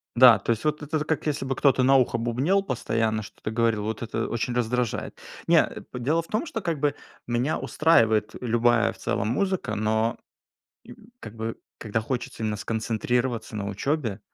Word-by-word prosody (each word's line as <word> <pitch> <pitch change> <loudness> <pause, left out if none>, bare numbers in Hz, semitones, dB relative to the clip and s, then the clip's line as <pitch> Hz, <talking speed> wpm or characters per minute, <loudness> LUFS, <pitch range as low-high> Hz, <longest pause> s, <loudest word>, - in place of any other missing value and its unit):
Да, 120 -3 +8
то 100 - -1
есть 115 +3 -2
вот 150 0 0
это 150 +2 -2
з 150 - -3
как 160 0 -1
если 145 -3 -1
бы 135 0 -1
кто-то 135 -2 +3
на 135 +2 +5
ухо 125 -2 +2
бубнил 130 +12 +1
постоянно, 115 - -1
что-то 110 +1 -7
говорил,- 115 -2 +1
вот 110 +1 -3
это 115 -1 -2
очень 120 +1 -2
раздражает. 125 -1 -1 0.3
Не, - - +6
а, - - -5
п 125 - -6
Дело 155 +7 +1
в 165 - -15
том, 215 +9 -1
что 225 -8 -4
как 165 -5 -2
бы 145 0 +1 0.3
меня 120 +5 0
устраивает 115 -9 +3
любая 120 -1 +3
в - - -15
целом 100 - -1
музыка, 190 - -1
но 110 +2 0 1.0
как 105 - -9
бы 115 0 -4 0.2
когда 110 0 -2
хочется 120 0 -4
именно 105 -1 -1
сконцентрироваться 115 +1 -2
на 100 -1 -3
учёбе, 115 0 -2
120 Hz, 185 wpm, -25 LUFS, 110-140 Hz, 1.0 s, Да